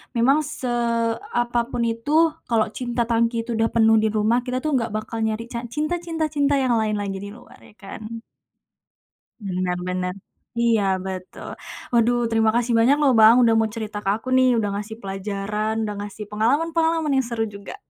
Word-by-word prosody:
memang 265 +6 +4
seapapun 240 -2 -1
itu, 290 +8 +2 0.2
kalau 225 -2 +2
cinta 240 -1 -2
tangki 230 0 0
itu 235 - -6
udah 225 0 +2
penuh 225 -1 +4
di 220 - +2
rumah. 215 +3 +2
Kita 255 +2 -2
tuh 310 - 0
enggak 225 -2 -4
bakal 220 +1 -4
nyari 220 +1 -2
ca 235 0 -4
cinta 305 +7 -2
cinta 325 -3 -3
cinta 285 -1 +2
yang 255 -4 +2
lain 215 -1 0
lagi 200 -1 -3
di 200 +1 -7
luar, - - -16
ya - - -19
kan. 220 +2 -8 1.2
Bener 185 -2 -2
bener. 180 0 -2 0.4
Iya 235 -2 +2 0.2
betul. 185 -1 -7 0.4
Waduh, 240 0 +3
terima 225 0 +2
kasih 240 0 +1
banyak 260 +5 +5
loh 280 - +4
Bang, 220 +2 +8
sudah 230 -1 +4
mau 220 - +2
cerita 215 -2 -5
ke 195 - -9
aku 225 +4 -10
nih, 255 0 +5
sudah 215 -3 0
ngasih 210 +2 -5
pelajaran, 200 +2 -3
sudah 210 -1 -3
ngasih 205 +1 -6
pengalaman-pengalaman 320 +7 +1
yang 265 - 0
seru 230 -2 -2
juga. 200 -2 -7
230 Hz, 175 wpm, -23 LUFS, 215-245 Hz, 1.2 s, Bang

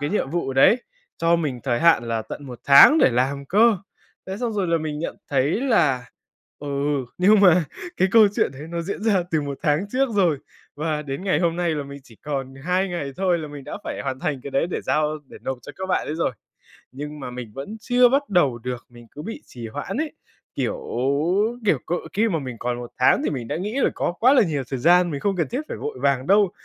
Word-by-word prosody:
cái 145 +3 -2
nhiệm 200 -9 -1
vụ 170 -5 -2
đấy, 215 - +5 0.4
cho 165 +1 +3
mình 145 -7 -3
thời 120 -3 0
hạn 165 -7 +5
là 115 -1 -1
tận 125 +6 -8
1 125 -2 -8
tháng 140 - +8
để 135 - +5
làm 135 +3 0
cơ. 215 +2 +4 0.5
Thế 190 - -4
xong 235 +1 -2
rồi 200 -3 -1
là 165 0 +2
mình 155 -1 -4
nhận 165 - -4
thấy 140 - +1
là, 140 - +2 0.5
ừ, 145 - -7 0.5
nhưng 200 +3 +5
mà 180 -3 +6 0.3
cái 190 - +3
câu 220 -2 +7
chuyện - - +1
đấy 135 +2 -10
nó 170 0 -3
diễn 200 +4 -5
ra 205 -5 +2
từ 160 - +1
1 140 -2 -5
tháng 150 +5 +2
trước 270 +1 +2
rồi 175 -8 +2 0.4
và 155 0 -2
đến 140 +6 -5
ngày 190 - +1
hôm 170 -1 +1
nay 175 -1 0
là 150 -2 -2
mình 140 0 -10
chỉ 115 -4 -17
còn 135 -3 -4
2 180 +8 -1
ngày 155 -6 -4
thôi 185 -3 +1
là 155 - -6
mình 145 -2 -9
đã - - -6
phải - - -4
hoàn 130 -1 -4
thành 140 -2 -2
cái 140 - -7
đấy 135 +5 +1
để - - -2
giao, 155 0 0
để - - -12
nộp 130 -1 -3
cho 145 - -10
các 190 - -4
bạn 185 - 0
ấy 150 - -3
rồi, 160 -5 0 0.6
nhưng 150 +2 -7
mà 125 - -6
mình 125 -4 -8
vẫn 140 +11 -6
chưa 245 +1 +4
bắt 280 +3 +1
đầu 140 -10 +2
được, 125 0 -6
mình 120 -1 -15
cứ 150 - -8
bị 225 +5 -7
trì 120 -2 -8
hoãn 145 +6 -5
ấy, 310 -1 -2 0.4
kiểu, - - -2 0.8
kiểu, 160 - +3
cỡ 175 - -1 0.2
khi 225 +3 +2
mà 170 -6 0
mình 130 -4 -6
còn 120 0 -2
1 120 -1 -7
tháng 125 - +4
thì - - 0
mình 125 -5 -4
đã - - -2
nghĩ 210 +9 -3
là - - +3
có - - -1
quá 245 +9 +4
là 265 - +6
nhiều 155 -8 -1
thời 135 - -2
gian, 175 +3 +5
mình 140 -3 -4
không 200 +2 0
cần 165 - 0
thiết 255 +5 -3
phải - - -5
vội 440 -1 -5
vàng 135 -1 +1
đâu, 200 0 +4
155 Hz, 245 wpm, -23 LUFS, 135-190 Hz, 0.8 s, tháng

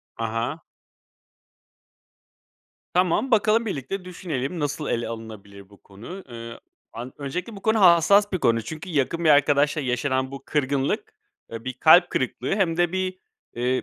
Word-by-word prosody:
Ha 115 - -4
ha. 115 +8 -3 2.3
Tamam, 180 +8 +2
bakalım 220 +1 +3
birlikte 185 - -4
düşünelim, 170 -4 -4
nasıl 145 +1 -2
ele 120 0 -1
alınabilir 105 -4 -9
bu 100 - -20
konu? 120 - -10
Iıı, 115 -1 -9 0.3
an 120 +3 -7
öncelikle 180 +10 -5
bu 195 - -11
konu 220 -1 +2
hassas 190 +3 +5
bir 185 - 0
konu. 115 -4 +2
Çünkü 160 - -8
yakın 165 +3 0
bir 155 - +5
arkadaşla 145 +1 +3
yaşanan 130 +1 -1
bu 135 -1 -8
kırgınlık, 140 -2 -1 0.4
ııı, 115 +1 -7
bir 130 - -3
kalp 170 +7 +6
kırıklığı 130 0 -2
hem 175 -5 +1
de 175 0 +1
bir, 185 0 -2 0.4
ııı, 125 +1 0
145 Hz, 150 wpm, -24 LUFS, 125-180 Hz, 2.3 s, kalp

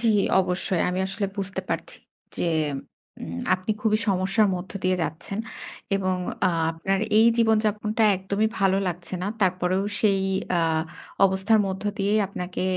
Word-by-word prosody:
জি, - - +2 0.3
অবশ্যই। 180 -1 -1
আমি 180 - -1
আসলে 200 +1 -2
বুঝতে 190 -1 -3
পারছি। - - -3 0.4
যে - - 0 0.8
উম 85 +1 -5
আপনি 185 +3 -4
খুবই 215 -1 +3
সমস্যার 195 +3 +2
মধ্য 180 +1 -6
দিয়ে 185 0 +3
যাচ্ছেন। 170 +7 -4 0.6
এবং 185 -1 0 0.3
আ - - +1 0.2
আপনার 190 +4 -1 0.2
এই 225 - +7
জীবনযাপনটা 215 -1 +2
একদমই 200 +3 0
ভালো 195 -1 +3
লাগছে 175 +1 -5
না। - - -1
তারপরেও 185 0 +1 0.2
সেই 200 -3 +3 0.4
আ - - +3 0.6
অবস্থার 195 +3 +3
মধ্য 190 0 -4 0.2
দিয়েই 205 +2 +2
আপনাকে 180 -2 -5
190 Hz, 140 wpm, -25 LUFS, 185-210 Hz, 0.8 s, এই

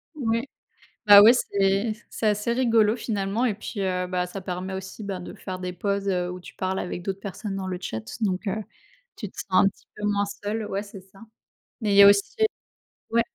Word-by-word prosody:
Oui. 230 -4 0 0.6
Bah, 205 0 +11
ouais, 225 +4 +9
c'est 200 -1 +1 0.2
c'est 220 - -2
assez 210 +2 +1
rigolo, 230 -3 +3
finalement. 215 0 -1
Et 215 -5 0
puis, 205 -1 -6
heu, 180 -1 -1
bah, 180 0 -1
ça 195 +2 -7
permet 185 +1 -4
aussi, 190 +3 -7
ben, 195 -2 -4
de 175 - -8
faire 185 -1 -7
des 180 -1 -4
pauses, 200 +2 -2
heu, 180 -2 0
où 180 0 -6
tu - - -12
parles 190 0 -2
avec 180 0 -4
d'autres 195 +1 -4
personnes 200 0 -5
dans 190 -1 -4
le 180 -1 -3
chat. 110 -9 -4 0.2
Donc 195 0 -1
heu, 210 +2 -2 0.5
tu 210 - -5
te - - -25
sens - - -5
un 190 +1 +5
petit - - -15
peu 210 - -6
moins 205 -1 +1
seule. 210 +2 -4
Ouais, 200 +1 -2
c'est 200 -1 -11
ça, 195 +2 -20 0.6
mais 210 -2 0
il - - +3
y 200 - +10
a - - +10
aussi 200 - +3 0.8
ouais. 235 0 +4
200 Hz, 220 wpm, -25 LUFS, 185-215 Hz, 0.8 s, Bah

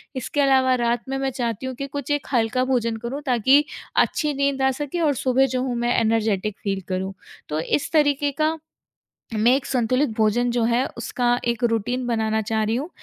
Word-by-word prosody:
इसके 265 +3 -1
अलावा 265 -2 +4
रात 235 0 +1
में 270 - -1
मैं 270 0 -1
चाहती 240 -2 -3
हूँ 260 0 -4
कि 275 +3 -5
कुछ 285 0 -5
एक 290 -1 -1
हल्का 235 +1 +2
भोजन 230 -2 0
करूँ, 275 +5 -4
ताकि 260 +3 +4 0.3
अच्छी 300 -2 +2
नींद 280 -1 0
आ 265 - +3
सके 295 +4 -3
और 300 -3 +3
सुबह 260 +1 +2
जो 255 - +1
हूँ, 255 -2 -2
मैं 240 +1 0
एनर्जेटिक 220 -3 0
फ़ील 195 -1 -1
करूँ। 190 +1 -3 0.4
तो 150 - -1
इस 220 - -1
तरीके 290 -2 +2
का 315 +1 +2 0.8
मैं 220 +3 +4
एक 270 - -1
संतुलित 255 +3 +1
भोजन 230 +3 +2
जो 240 -1 0
है, 235 +2 +2
उसका 245 -1 0
एक 235 +1 -1
रूटीन 245 +3 -1
बनाना 220 -2 0
चाह 220 +1 -1
रही 220 +2 0
हूँ। 285 +6 -3
245 Hz, 200 wpm, -23 LUFS, 225-270 Hz, 0.8 s, अलावा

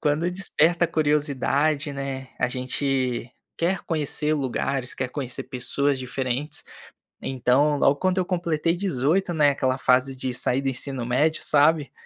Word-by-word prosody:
Quando 155 +4 0
desperta 175 -2 +2
a - - -1
curiosidade, 145 0 0
né, 135 -1 -5
a - - +2
gente 130 -1 -2 0.2
quer 175 +2 0
conhecer 150 -1 +1
lugares, 135 -2 -2
quer 130 - -3
conhecer 130 -2 -3
pessoas 140 +2 -1
diferentes. 130 +2 -2 0.6
Então, 135 +3 +1
logo 140 - +4
quando 185 +5 0
eu 185 - 0
completei 170 -2 0
18, 175 0 0
né, 150 -3 +4
aquela 130 -2 -1
fase 130 +1 +2
de 130 -1 -4
sair 125 +2 +1
do 135 - -1
ensino 135 0 -2
médio, 145 +6 +1
sabe, 150 0 +3
140 Hz, 145 wpm, -24 LUFS, 130-155 Hz, 0.6 s, logo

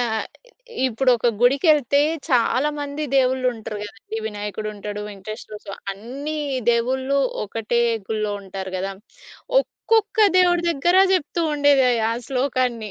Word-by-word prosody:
ఆహ్, 220 -2 -1 0.6
ఇప్పుడు 255 +1 +1
ఒక 235 - -1
గుడికేళ్తే 280 +2 +4 0.3
చాలామంది 285 +4 0
దేవుళ్ళుంటరు 255 -4 +1
కదండీ! 220 +1 -8
వినాయకుడు 210 0 -5
ఉంటాడు, 205 0 -6
వెంకటేస్వర 210 +2 -8
స్వా 200 - -7 0.2
అన్నీ 265 +10 -6 0.3
దేవుళ్ళు 260 +4 +1 0.3
ఒకటే 225 +3 -1 0.3
గుళ్ళో 215 -1 -2
ఉంటారు 190 -1 -7
గదా! 195 +1 -3 0.7
ఒక్కొక్క 445 -2 -1 0.2
దేవుడి 350 -1 +4
దగ్గర 340 +4 +2 0.2
చెప్తూ 345 -1 -1
ఉండేది 285 -2 +4 0.3
ఆ - - +1 0.2
శ్లోకాన్ని. 250 -4 -1
250 Hz, 110 wpm, -22 LUFS, 215-285 Hz, 0.7 s, గుడికేళ్తే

